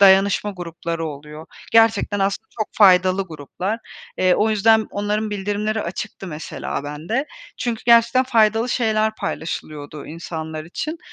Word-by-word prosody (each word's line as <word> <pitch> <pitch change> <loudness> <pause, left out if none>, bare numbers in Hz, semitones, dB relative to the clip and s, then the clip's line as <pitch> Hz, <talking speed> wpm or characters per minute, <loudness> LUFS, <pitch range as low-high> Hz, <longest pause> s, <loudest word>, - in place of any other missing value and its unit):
dayanışma 195 +1 +5
grupları 170 -3 -4
oluyor. 150 +2 -9 0.3
Gerçekten 225 -2 +4
aslında 195 +3 -1
çok 215 - -1
faydalı 185 -1 +5
gruplar. 170 +8 -4 0.4
Eee, 185 -1 +4
o 220 +1 +2
yüzden 220 +1 +4
onların 210 +1 -1
bildirimleri 205 +2 -1
açıktı 185 +2 -6
mesela 150 -3 -5
bende. 165 - -2 0.3
Çünkü 235 -2 -3
gerçekten 235 +2 +5
faydalı 225 -1 +3
şeyler 220 -3 +1
paylaşılıyordu 150 -2 -5
insanlar 160 -1 -6
için 305 - -5
200 Hz, 125 wpm, -21 LUFS, 165-220 Hz, 0.4 s, dayanışma